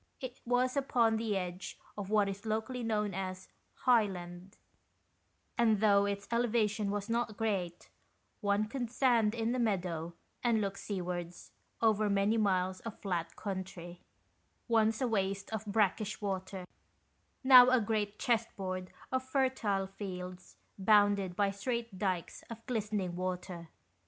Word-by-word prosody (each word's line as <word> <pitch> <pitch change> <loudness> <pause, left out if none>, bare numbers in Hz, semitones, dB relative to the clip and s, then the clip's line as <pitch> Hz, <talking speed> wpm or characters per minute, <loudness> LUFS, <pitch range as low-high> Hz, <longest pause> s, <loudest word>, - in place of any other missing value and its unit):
It 255 -2 -7
was 250 +2 +2
upon 235 -5 +2
the 220 -3 0
edge 180 0 -5 0.2
of 200 -2 -5
what 210 -1 +3
is 200 +1 -5
locally 220 +4 -2
known 210 -3 0
as 185 0 -4 0.2
" - - -43
high 235 -4 +6
land 175 +1 -8 0.5
"; - - -44
and 220 -3 +4
though 200 -1 +4
its 200 0 -3
elevation 225 -3 +1
was 205 0 -2
not 230 -2 -1
great, 190 -6 -2 0.5
one 205 0 +1
could 240 +1 -4
stand 235 -3 +3
in 230 0 0
the 255 - 0
meadow 175 -7 -1 0.3
and 235 -2 +3
look 200 -1 -1
sea 200 -3 -4
wards 175 -1 -5 0.3
over 215 -1 +3
many 200 +2 +2
miles 185 -3 +1
of 230 -2 -8
flat 175 -4 -3
country, 185 -3 -6 0.7
once 225 -1 +2
a 255 - +2
waste 195 -1 -1
of 220 -1 -4
brackish 210 0 +1
water, 190 -2 -4 0.8
now 255 -1 +9
a 255 0 +5
great 210 -1 -1
chess 235 -3 +1
board 185 -1 -4 0.2
of 260 0 +1
fertile 260 -7 0
fields 185 -2 -7 0.2
bounded 200 -2 +4
by 200 +1 +2
straight 230 0 -3
dykes 185 -4 -2
of 230 -1 -9
glistening 210 -6 -2
water. 180 -2 -4
205 Hz, 145 wpm, -32 LUFS, 190-225 Hz, 0.8 s, now